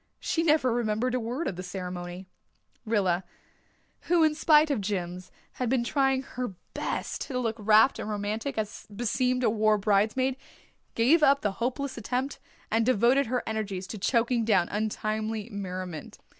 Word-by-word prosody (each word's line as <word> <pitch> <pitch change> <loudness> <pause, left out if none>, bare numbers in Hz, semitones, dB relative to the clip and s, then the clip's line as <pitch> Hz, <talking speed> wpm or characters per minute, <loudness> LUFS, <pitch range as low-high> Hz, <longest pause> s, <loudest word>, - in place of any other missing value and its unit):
She 330 - 0
never 300 -6 +3
remembered 235 +1 0
a 255 - +1
word 245 +8 -3
of 175 - -4
the - - -4
ceremony. 180 0 -6 0.6
Rilla, 190 -5 +1 0.9
who 345 -2 +5
in 310 -1 +4
spite 305 0 +4
of 255 -7 0
Jims, 185 -2 -4 0.2
had 250 -2 -3
been 255 -1 +2
trying 270 +1 +1
her 250 -7 -5 0.2
best - - -3
to 260 - -3
look 230 -3 -1
rapt 215 +4 +5
and - - -4
romantic, 215 +5 -3
as 215 -1 -4
beseemed 250 +4 0
a - - +4
war 215 -1 +3
bridesmaid, 215 +6 +1 0.6
gave 270 +9 +4
up 280 -1 +5
the 205 - 0
hopeless 260 +1 -2
attempt, 255 +5 -2 0.3
and 225 +1 +3
devoted 250 +3 +3
her 250 +1 -1
energies 200 -4 -3
to 215 - -7
choking 235 +3 +1
down 195 -6 +2
untimely 215 +1 -2
merriment. 185 -5 -6
225 Hz, 155 wpm, -28 LUFS, 205-255 Hz, 0.9 s, who